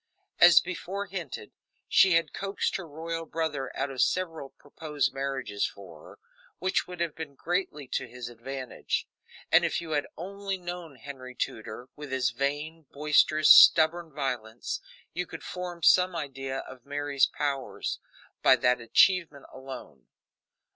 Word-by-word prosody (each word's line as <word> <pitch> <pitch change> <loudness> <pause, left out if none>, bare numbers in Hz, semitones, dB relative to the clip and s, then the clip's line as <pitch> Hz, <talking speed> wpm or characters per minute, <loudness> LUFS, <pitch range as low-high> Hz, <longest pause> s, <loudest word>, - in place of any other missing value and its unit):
As 175 0 +9
before 185 +2 -5
hinted, 175 - -6 0.4
she 190 - +5
had 165 0 +2
coaxed 195 0 -2
her 185 -3 -8
royal 165 +2 -5
brother 150 -5 -2
out 140 - -1
of 130 - -2
several 165 -6 0
proposed 150 0 -3
marriages 135 -6 -2
for 90 -6 -12
her, - - -14 0.4
which 185 +2 0
would 180 -1 -9
have 170 -3 -1
been 150 -3 -8
greatly 165 -3 -2
to - - -2
his 125 0 -8
advantage; 125 +2 -4 0.4
and - - +6
if - - 0
you 170 -2 -7
had 145 -1 0
only 195 +2 -4
known 175 -4 -7
Henry 130 0 -9
Tudor, 110 +2 -5
with 150 -2 -9
his 130 -3 +1
vain, 145 +5 -3
boisterous, 150 +1 +4
stubborn 165 +1 +7
violence, 125 -6 -3 0.3
you 180 0 -3
could 165 -3 -9
form 180 -2 -6
some 180 +1 +5
idea 135 -3 -4
of 130 -2 -12
Mary's 145 0 +1
powers 140 -2 -3 0.4
by 130 - +7
that 125 0 +2
achievement 165 - +3
alone. 130 - -10
145 Hz, 145 wpm, -28 LUFS, 130-170 Hz, 0.4 s, As